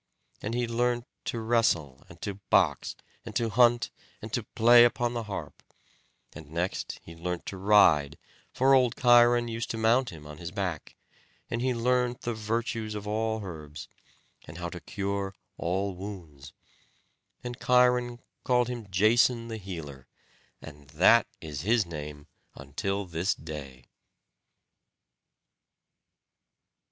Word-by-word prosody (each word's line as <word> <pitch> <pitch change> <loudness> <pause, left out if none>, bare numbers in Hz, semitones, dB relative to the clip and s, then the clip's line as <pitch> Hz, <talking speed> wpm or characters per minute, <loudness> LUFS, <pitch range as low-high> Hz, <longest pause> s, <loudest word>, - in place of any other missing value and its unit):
And 110 +3 -3
he 120 -1 0
learnt 120 +1 0 0.2
to 115 - -3
wrestle, 110 - +1
and - - -14
to 100 -1 -4
box, - - +2 0.3
and - - -9
to 115 -1 +1
hunt, 120 +2 +4 0.3
and - - -9
to - - 0
play 120 +1 +6
upon 120 0 +1
the 115 -2 -3
harp; 105 - -7 0.7
and 75 -2 -11
next 85 +4 -3
he 85 - -11
learnt 90 +1 -4
to 95 - -6
ride, 85 -8 +4 0.3
for 135 +1 +3
old 125 -3 +4
Cheiron 120 -1 +5
used 115 0 -4
to 115 - -3
mount 115 +3 +3
him 75 -3 -11
on 75 +1 -10
his 85 -1 -5
back; 90 -4 -4 0.6
and 115 - -1
he 130 -1 0
learnt 125 +1 +1
the 120 - -2
virtues 110 0 -3
of 105 -1 -6
all 110 +1 -1
herbs, 75 -5 -8 0.6
and 75 - -10
how 85 0 -4
to 90 - -8
cure 100 0 -3 0.2
all 95 +3 -1
wounds; 90 -8 -9 0.9
and 120 +1 -6
Cheiron 125 -1 +3 0.3
called 125 -1 +2
him 120 -5 -6
Jason 115 +4 +3
the 110 - -4
healer, 80 -10 -8 0.6
and 70 -2 -12
that 95 +10 +5
is 75 -4 -6
his 110 +2 +2
name 75 -3 -7 0.3
until 95 +9 -3
this 85 +2 -1
day. 70 -5 -9
105 Hz, 140 wpm, -28 LUFS, 85-120 Hz, 0.9 s, play